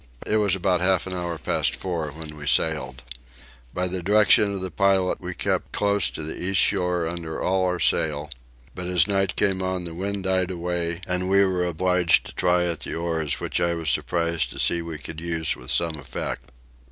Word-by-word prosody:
It 110 Hz, -, +1 dB
was 100 Hz, -3 st, +2 dB
about 90 Hz, -1 st, +1 dB
half 95 Hz, -1 st, +3 dB
an 95 Hz, -, -4 dB
hour 85 Hz, -2 st, -3 dB
past -, -, 0 dB
four 85 Hz, -4 st, -3 dB
when 75 Hz, +1 st, -8 dB
we 75 Hz, -1 st, -8 dB
sailed. 80 Hz, -6 st, +1 dB, 0.7 s
By 90 Hz, 0 st, -1 dB
direction 100 Hz, +3 st, +4 dB
of 95 Hz, -, -4 dB
the 95 Hz, -1 st, -4 dB
pilot 95 Hz, -1 st, +2 dB
we -, -, -5 dB
kept -, -, -2 dB
close 100 Hz, -1 st, +2 dB
to 80 Hz, -, -7 dB
the 80 Hz, -, -4 dB
east 95 Hz, +1 st, +1 dB
shore 90 Hz, -4 st, +2 dB
under 85 Hz, -1 st, -5 dB
all 95 Hz, 0 st, +1 dB
our 90 Hz, -1 st, -1 dB
sail; 75 Hz, -3 st, +1 dB, 0.4 s
but 90 Hz, -, -6 dB
as 90 Hz, -1 st, +3 dB
night 95 Hz, -1 st, 0 dB
came 95 Hz, -2 st, +1 dB
on 95 Hz, -1 st, -2 dB
the 85 Hz, -1 st, -6 dB
wind 100 Hz, +3 st, -3 dB
died 95 Hz, -1 st, +1 dB
away 85 Hz, -1 st, -2 dB
and 90 Hz, 0 st, -1 dB
we 100 Hz, +1 st, +5 dB
were 90 Hz, -2 st, 0 dB
obliged 90 Hz, 0 st, +2 dB
to -, -, -7 dB
try 90 Hz, 0 st, +2 dB
at 85 Hz, -1 st, -2 dB
the -, -, -5 dB
oars 80 Hz, -3 st, -1 dB
which -, -, -2 dB
I 85 Hz, 0 st, +1 dB
was 80 Hz, -4 st, 0 dB
surprised 85 Hz, +2 st, 0 dB
to -, -, -10 dB
see 85 Hz, -, +2 dB
we 85 Hz, -2 st, -6 dB
could 80 Hz, +1 st, -8 dB
use 80 Hz, -2 st, -1 dB
with -, -, -11 dB
some 85 Hz, -2 st, +1 dB
effect. 65 Hz, -1 st, -5 dB
90 Hz, 200 wpm, -24 LUFS, 80-95 Hz, 0.7 s, we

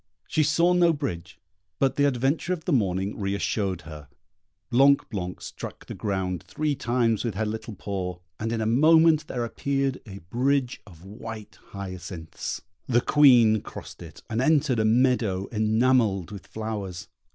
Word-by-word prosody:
She 155 Hz, -, +1 dB
saw 170 Hz, +4 st, +3 dB
no 175 Hz, -2 st, +4 dB
bridge, 90 Hz, -, -5 dB, 0.4 s
but 135 Hz, -1 st, +1 dB
the 145 Hz, -, +3 dB
adventure 140 Hz, +6 st, +1 dB
of 160 Hz, -3 st, -6 dB
the 175 Hz, -, +1 dB
morning 95 Hz, -4 st, 0 dB
re 100 Hz, 0 st, -1 dB
assured 100 Hz, -2 st, -1 dB
her. 75 Hz, -2 st, -10 dB, 0.6 s
Blanc 135 Hz, +3 st, +5 dB
blanc 90 Hz, -4 st, -5 dB
struck -, -, -8 dB
the -, -, -7 dB
ground 95 Hz, -4 st, -2 dB
three 150 Hz, +12 st, -2 dB
times 120 Hz, -4 st, 0 dB
with 115 Hz, -5 st, -3 dB
her 110 Hz, +2 st, -1 dB
little 110 Hz, 0 st, -5 dB
paw, 90 Hz, -2 st, -4 dB, 0.2 s
and 115 Hz, +1 st, -2 dB
in 115 Hz, -1 st, -1 dB
a -, -, 0 dB
moment 155 Hz, +5 st, +5 dB
there 120 Hz, -2 st, -2 dB
appeared 135 Hz, +2 st, -2 dB
a 100 Hz, -1 st, -8 dB
bridge 130 Hz, +1 st, 0 dB
of 85 Hz, -4 st, -15 dB
white 110 Hz, +1 st, -9 dB
hyacinths. 95 Hz, -4 st, -6 dB, 0.3 s
The 120 Hz, -1 st, +3 dB
Queen 120 Hz, -7 st, +5 dB
crossed -, -, -10 dB
it, -, -, -11 dB
and 110 Hz, +2 st, -1 dB
entered 145 Hz, -4 st, +2 dB
a 110 Hz, -, +2 dB
meadow 110 Hz, -5 st, +2 dB
enamelled 110 Hz, -3 st, +2 dB
with 95 Hz, -4 st, -9 dB
flowers. 105 Hz, -6 st, -5 dB
110 Hz, 160 wpm, -26 LUFS, 95-135 Hz, 0.6 s, Blanc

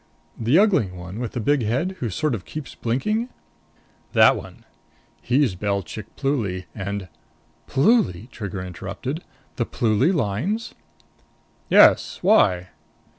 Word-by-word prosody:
"The 120 Hz, +7 st, +2 dB
ugly 200 Hz, -, +4 dB
one 90 Hz, +3 st, -8 dB
with 120 Hz, -3 st, -4 dB
the -, -, -2 dB
big 140 Hz, +4 st, +2 dB
head 135 Hz, -, -1 dB
who 120 Hz, -, -2 dB
sort 150 Hz, -, -1 dB
of 105 Hz, -5 st, -4 dB
keeps 155 Hz, -3 st, -8 dB
blinking?" 215 Hz, -, -1 dB, 0.8 s
"That -, -, +6 dB
one. -, -, -10 dB, 0.6 s
He's 130 Hz, -3 st, +2 dB
Belchik 100 Hz, +2 st, -3 dB
Pluly 110 Hz, -10 st, -1 dB
and 100 Hz, -1 st, -4 dB, 0.3 s
" -, -, -38 dB
"Pluly?" 135 Hz, -, +2 dB
Trigger 100 Hz, -5 st, -5 dB
interrupted. 130 Hz, -, -6 dB, 0.3 s
"The 120 Hz, -, -1 dB
Pluly 115 Hz, -, +2 dB
Lines?" 160 Hz, -, -1 dB, 1.0 s
"Yes. -, -, +6 dB
Why?" 90 Hz, 0 st, +4 dB
115 Hz, 125 wpm, -23 LUFS, 100-145 Hz, 1.0 s, That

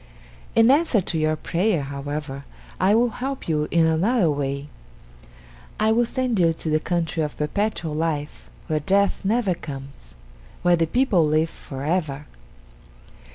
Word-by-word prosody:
"In 225 Hz, +2 st, +6 dB
answer 290 Hz, -5 st, +3 dB
to 170 Hz, -3 st, -2 dB
your 155 Hz, 0 st, +1 dB
prayer, 170 Hz, +1 st, 0 dB
however, 140 Hz, 0 st, -5 dB, 0.4 s
I 195 Hz, +4 st, +4 dB
will 240 Hz, +2 st, +3 dB
help 270 Hz, +1 st, -4 dB
you 150 Hz, -2 st, 0 dB
in 165 Hz, -1 st, +3 dB
another 175 Hz, +3 st, +2 dB
way. 140 Hz, 0 st, -3 dB, 1.1 s
I 215 Hz, +1 st, +3 dB
will 235 Hz, +1 st, +3 dB
send 250 Hz, -4 st, -1 dB
you 165 Hz, -2 st, +4 dB
to 160 Hz, -, -5 dB
the 155 Hz, -, +3 dB
country 165 Hz, -1 st, -1 dB
of 150 Hz, -1 st, -3 dB
Perpetual 165 Hz, 0 st, -1 dB
Life, 150 Hz, -, -3 dB, 0.2 s
where 155 Hz, -1 st, 0 dB
death 200 Hz, +7 st, +1 dB
never 210 Hz, -1 st, +1 dB
comes 135 Hz, -, -9 dB, 0.5 s
where 175 Hz, 0 st, +5 dB
the 165 Hz, -1 st, +1 dB
people 215 Hz, -4 st, +3 dB
live 155 Hz, +2 st, +1 dB
for 135 Hz, -1 st, -8 dB
ever!" 150 Hz, -3 st, -1 dB
165 Hz, 150 wpm, -23 LUFS, 150-205 Hz, 1.1 s, In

